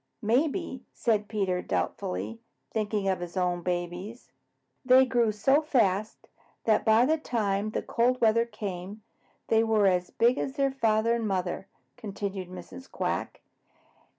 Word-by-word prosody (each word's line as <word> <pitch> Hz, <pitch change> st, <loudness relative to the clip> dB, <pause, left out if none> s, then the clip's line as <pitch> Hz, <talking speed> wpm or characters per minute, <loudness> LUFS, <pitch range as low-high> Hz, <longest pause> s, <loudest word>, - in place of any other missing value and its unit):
"Maybe," 265 Hz, -, 0 dB
said 215 Hz, -3 st, +1 dB
Peter 195 Hz, -4 st, -1 dB
doubtfully, 90 Hz, +3 st, -3 dB, 0.3 s
thinking 210 Hz, -2 st, -1 dB
of 190 Hz, -1 st, +1 dB
his 175 Hz, +1 st, -6 dB
own 180 Hz, -1 st, 0 dB
babies. 180 Hz, +6 st, -4 dB, 0.5 s
"They 260 Hz, 0 st, +6 dB
grew 240 Hz, -3 st, +2 dB
so 270 Hz, +8 st, +3 dB
fast 215 Hz, -9 st, 0 dB, 0.4 s
that 220 Hz, -, +3 dB
by 220 Hz, +2 st, +5 dB
the 315 Hz, +3 st, +2 dB
time 210 Hz, -6 st, -1 dB
the -, -, -3 dB
cold 250 Hz, +2 st, +1 dB
weather 230 Hz, +1 st, +3 dB
came, 205 Hz, -1 st, -6 dB, 0.5 s
they 225 Hz, 0 st, +4 dB
were 220 Hz, -2 st, +3 dB
as 180 Hz, -2 st, +2 dB
big 240 Hz, +3 st, +2 dB
as 265 Hz, -, -2 dB
their 275 Hz, -1 st, +1 dB
father 225 Hz, -3 st, +2 dB
and 230 Hz, -2 st, -1 dB
mother," 190 Hz, -1 st, -2 dB, 0.3 s
continued 200 Hz, -4 st, -5 dB
Mrs. 225 Hz, +8 st, -10 dB
Quack. -, -, -3 dB
215 Hz, 140 wpm, -28 LUFS, 185-235 Hz, 0.5 s, They